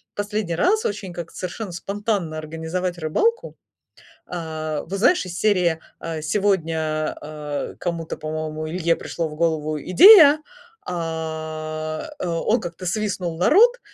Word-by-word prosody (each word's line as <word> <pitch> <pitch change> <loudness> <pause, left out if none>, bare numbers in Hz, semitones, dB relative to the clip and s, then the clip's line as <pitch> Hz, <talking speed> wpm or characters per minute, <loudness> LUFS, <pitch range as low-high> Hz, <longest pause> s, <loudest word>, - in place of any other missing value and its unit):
последний 205 -4 -2
раз 420 - +2
очень 200 -3 -3
как-то 170 -1 -8
совершенно 185 +3 -5
спонтанно 195 -2 -2
организовать 160 +3 -4
рыбалку. 450 - 0 0.7
А, 155 -3 -4
вот 195 +2 -3
знаешь, 295 - +4
из 180 0 -6
серии, 180 -6 +2 0.2
а, 165 -1 -4
сегодня, 160 -4 0
а, 150 -1 -5
кому-то, 170 -2 -3
по-моему, 155 0 -4
Илье 170 0 +1
пришло 165 -2 -4
в 150 - -9
голову 155 -2 0
идея, 310 - +8 0.5
а, 160 - -4
э, - - -3
он 170 +7 +1
как-то 175 -1 -7
свистнул 180 -3 -2
народ, 465 - +5
170 Hz, 125 wpm, -22 LUFS, 155-200 Hz, 0.7 s, идея